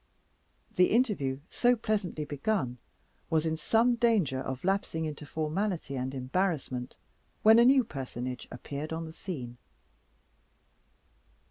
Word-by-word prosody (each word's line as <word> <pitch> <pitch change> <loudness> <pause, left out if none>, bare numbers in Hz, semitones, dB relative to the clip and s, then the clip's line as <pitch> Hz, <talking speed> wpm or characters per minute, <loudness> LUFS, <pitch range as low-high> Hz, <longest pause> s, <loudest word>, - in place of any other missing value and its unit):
The 180 - +6
interview 190 - +1
so 245 0 +3
pleasantly 205 -9 -2
begun 145 - -1 0.5
was 160 0 +2
in 160 0 0
some 230 +8 +3
danger 205 - +2
of 130 -1 -5
lapsing 185 -4 0
into 150 -1 -6
formality 160 0 -2
and 130 +1 -3
embarrassment, 130 -2 -2 0.5
when 220 +1 +8
a 235 - +7
new 260 0 +6
personage 130 - -5
appeared 140 +5 -6
on 165 0 -3
the 160 - -9
scene. 125 -10 -6
160 Hz, 120 wpm, -30 LUFS, 135-210 Hz, 0.5 s, when